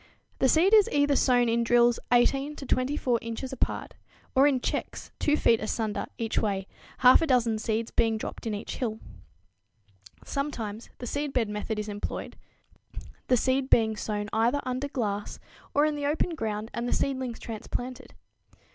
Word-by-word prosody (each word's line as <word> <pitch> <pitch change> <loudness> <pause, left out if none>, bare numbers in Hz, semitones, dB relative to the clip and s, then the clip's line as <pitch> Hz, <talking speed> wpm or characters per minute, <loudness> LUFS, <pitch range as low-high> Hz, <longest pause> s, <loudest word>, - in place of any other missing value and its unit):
The 265 - +4
seed 355 - +4
is 425 -2 +7
either 285 0 +3
sown 245 -2 +3
in 230 +1 +2
drills 240 0 +4
18 270 +4 +3
to 275 - -8
24 255 -2 0
inches 230 +3 -5
apart - - -2 0.4
or 270 +2 +6
in 270 -3 +2
checks - - -4
2 300 0 +2
feet 230 -6 +4
asunder 215 -1 -2
each 225 -1 -1
way, 195 -3 -1 0.4
half 250 - +8
a 325 - +1
dozen 235 -5 +2
seeds 220 +1 -2
being 225 -1 +2
dropped 220 - -6
in 215 - -1
each 205 - -6
"hill." 225 -4 -2 1.3
Sometimes 235 -7 -4
the 245 - -7
seedbed 270 -4 -1
method 210 +1 -3
is 210 0 -3
employed, 205 -1 -5 0.9
the 250 - +4
seed 260 +2 +1
being 220 -1 +4
sown 210 -1 -3
either 235 +6 +2
under 255 +2 -2
glass 210 -7 -3 0.4
or 290 - +5
in 305 - +1
the 290 -1 -2
open 315 +4 0
ground 220 -5 -3
and 235 +1 -3
the - - +1
seedlings 260 -3 -1
transplanted. 245 +3 -6
245 Hz, 165 wpm, -27 LUFS, 220-275 Hz, 1.3 s, half